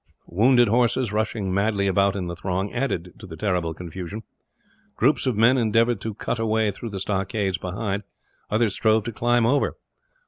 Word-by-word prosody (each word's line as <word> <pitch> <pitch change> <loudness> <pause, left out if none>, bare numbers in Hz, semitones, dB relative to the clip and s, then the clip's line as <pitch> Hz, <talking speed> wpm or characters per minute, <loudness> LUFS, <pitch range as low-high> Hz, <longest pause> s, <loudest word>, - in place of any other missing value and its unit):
Wounded 120 +6 +4
horses, 120 0 +1
rushing 105 -3 -1
wildly 100 0 +1
about 100 +1 +2
in 95 -3 -3
the 85 0 -5
throng, 95 +3 -3
added 105 -9 -2
to - - -10
the 80 -2 -9
terrible 90 -6 -1
confusion. 90 +5 -7 0.7
Groups 135 +3 +2
of 120 -5 0
men 120 +4 +5
endeavoured 115 -1 +2
to 110 -2 -4
cut 115 - -3
a 115 - 0
way 110 -1 +2
through 115 +4 -7
the 100 -2 -5
stockades 95 -1 -1
behind, 100 +2 -3 0.5
others 110 -1 +1
strove 110 0 +2
to 120 - -4
climb 120 +1 +2
over. 140 +5 +1
105 Hz, 175 wpm, -24 LUFS, 95-115 Hz, 0.7 s, men